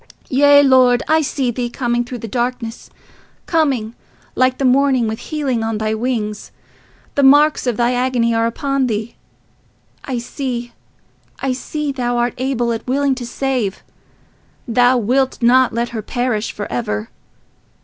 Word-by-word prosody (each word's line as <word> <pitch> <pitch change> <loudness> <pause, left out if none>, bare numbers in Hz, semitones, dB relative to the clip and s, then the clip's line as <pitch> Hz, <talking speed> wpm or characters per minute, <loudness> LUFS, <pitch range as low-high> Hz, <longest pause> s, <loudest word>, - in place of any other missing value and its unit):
"Yea, 285 +2 +6
Lord, 255 -2 +4
I 315 0 +3
see 270 -4 -1
thee, 240 0 -3
coming 240 -1 -1
through 245 +1 -7
the 230 - -7
darkness, 240 0 -3 0.6
coming, 270 -9 0 0.4
like 255 0 +2
the 275 - -1
morning, 260 -2 +3
with 220 +1 -4
healing 270 -4 -2
on 225 -1 -2
thy 215 0 -1
wings. 220 -2 -3 0.6
The 285 - +1
marks 290 +1 +5
of 240 -3 0
thy 240 +1 +2
agony 245 -2 +1
are 225 0 +2
upon 275 +2 -1
thee—I 230 +3 -8
see, 240 -1 -5 0.6
I 270 -1 -1
see 295 +3 -4
thou 245 -2 -2
art 240 0 0
able 250 -2 0
and 225 - -2
willing 275 +1 +1
to 250 -2 -6
save—thou 245 0 -2
wilt 255 +4 0
not 250 +1 +4
let 235 +1 -2
her 225 -2 -5
perish 235 -1 -2
for 205 - -6
ever. 110 -3 -3
245 Hz, 145 wpm, -18 LUFS, 230-265 Hz, 0.6 s, Yea